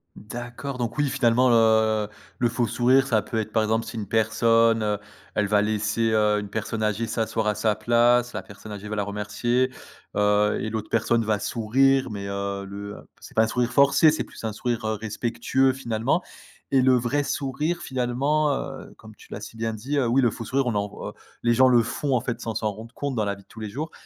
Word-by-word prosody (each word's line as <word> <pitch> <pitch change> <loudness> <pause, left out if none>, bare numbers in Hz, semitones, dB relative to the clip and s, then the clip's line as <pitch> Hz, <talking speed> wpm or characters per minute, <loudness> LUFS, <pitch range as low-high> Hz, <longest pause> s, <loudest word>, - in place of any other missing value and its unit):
D'accord, 120 +5 -7
donc 120 +1 -3
oui 145 -2 +2
finalement 125 +1 +3
le 110 -2 +3 0.3
le 120 - +3
faux 120 0 0
sourire 130 +4 +3
ça 110 -5 +2
peut 115 - -5
être 110 0 -2
par 110 0 +2
exemple 110 +1 0
si 115 +1 -7
une 105 -2 -4
personne 115 0 +2 0.4
elle 105 - +1
va 105 0 +3
laisser, 110 +1 0
heu, 105 -1 +3
une 105 - -6
personne 110 +1 -4
âgée 105 +2 0
s'asseoir 110 -1 -1
à 105 - +1
sa 110 -2 +1
place, 120 +2 +3
la 105 - -4
personne 100 +2 -12
âgée 105 0 -7
va 105 - -4
la 100 - 0
remercier, 105 +5 -1 0.4
heu 105 0 +3
et 110 - -2
l'autre 110 -1 -4
personne 115 0 +1
va 105 -1 +1
sourire 130 +5 +2
mais, 100 -1 -5
heu, 100 0 -3
le 100 +1 -7 0.2
c'est - - -13
pas 110 - +5
un - - +1
sourire 120 +1 -1
forcé, 140 +4 +6
c'est 155 - 0
plus - - -13
un 110 - -2
sourire 120 +1 -2
respectueux 115 +4 0
finalement. 130 +5 -1 0.5
Et 135 -1 +4
le 130 0 +5
vrai 125 +4 +1
sourire 145 +5 -2
finalement, 135 +4 0
heu, 135 -1 -6
comme 110 -1 -14
tu - - -17
l'as 105 - -6
si 110 - -9
bien 115 0 -2
dit 135 +7 -2
oui 125 +1 +3
le 120 -3 +3
faux 115 - -7
sourire 135 -1 0
on 115 - 0
en 100 0 0
voit - - -8 0.3
les 120 - +3
gens 130 +2 +5
le 120 -2 +5
font 135 +3 -1
en 120 - +1
fait 125 -1 -3
sans 115 -2 -4
s'en 110 -1 -1
rendre 110 +3 -11
compte 140 -2 -3
dans 110 - 0
la 100 0 -1
vie 100 - -16
de - - -42
tous 110 - -12
les 110 - -5
jours 150 +9 -5
115 Hz, 220 wpm, -25 LUFS, 105-125 Hz, 0.5 s, forcé